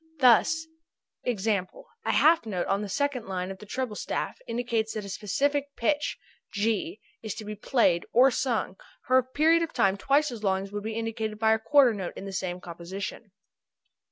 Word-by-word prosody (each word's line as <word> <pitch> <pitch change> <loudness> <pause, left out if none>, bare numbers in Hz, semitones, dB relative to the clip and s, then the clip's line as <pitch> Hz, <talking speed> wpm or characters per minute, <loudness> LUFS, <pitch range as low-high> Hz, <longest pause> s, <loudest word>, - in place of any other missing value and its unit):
Thus 285 +5 +4 0.6
e.g., 225 -4 -1
a 210 - -2
half 320 -6 +4
note 185 -5 -2
on 195 +1 0
the 205 - -5
second 275 +1 -1
line 185 0 -3
of 190 - -9
the 210 - -12
treble 250 -1 -3
staff - - -3
indicates 230 -2 -1
that 215 -2 -4
a - - -7
specific 280 +9 -1
pitch 295 +5 0 0.3
(g') 225 - -1 0.2
is 220 -3 -5
to 220 - -7
be 210 - -5
played 205 -5 +1
or 260 +3 +6
sung 225 -7 -1 0.3
for 255 +1 +5
a - - 0
period 310 +6 +3
of 330 - -3
time 195 0 +2
twice 280 +6 +2
as 225 -3 -8
long 190 -1 +1
as 195 - -9
would 205 0 -4
be 220 +1 -4
indicated 225 -1 -3
by 220 0 +4
a 220 - +1
quarter 270 0 +5
note 190 -4 -5
in - - -7
the 195 - -6
same 185 -1 -3
composition. 180 +5 -7
220 Hz, 190 wpm, -27 LUFS, 195-260 Hz, 0.6 s, or